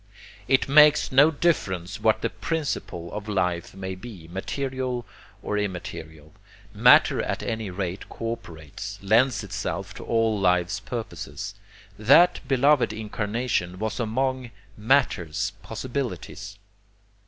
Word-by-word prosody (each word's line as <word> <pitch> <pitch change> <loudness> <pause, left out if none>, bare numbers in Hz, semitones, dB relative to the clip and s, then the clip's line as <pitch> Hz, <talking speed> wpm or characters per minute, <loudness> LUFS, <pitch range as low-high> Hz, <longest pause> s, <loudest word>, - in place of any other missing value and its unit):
It 135 -1 +3
makes 150 +1 +6
no 140 +4 +7
difference 100 - -1
what 110 0 +2
the - - 0
PRINCIPLE 140 - -3
of 105 0 -6
life 90 -3 -1
may 95 -1 -5
be, 95 -4 -10
material 130 +5 -3 0.4
or 105 - -1
immaterial, 80 -6 -6 0.4
matter - - +6
at - - -3
any 110 -3 -3
rate 95 0 -4
co 115 0 -4
operates, 80 -10 -9
lends 110 +2 +3
itself 95 +2 -4
to - - -9
all 115 -2 +1
life's 90 +1 +2
purposes. 105 -2 -6 0.5
That 145 +11 +6
beloved 135 -1 +3
incarnation 105 -3 -2
was 110 +4 -3
among 130 +2 -1 0.3
matter's 105 - +1
possibilities. 110 -4 -5
110 Hz, 115 wpm, -25 LUFS, 95-130 Hz, 0.5 s, no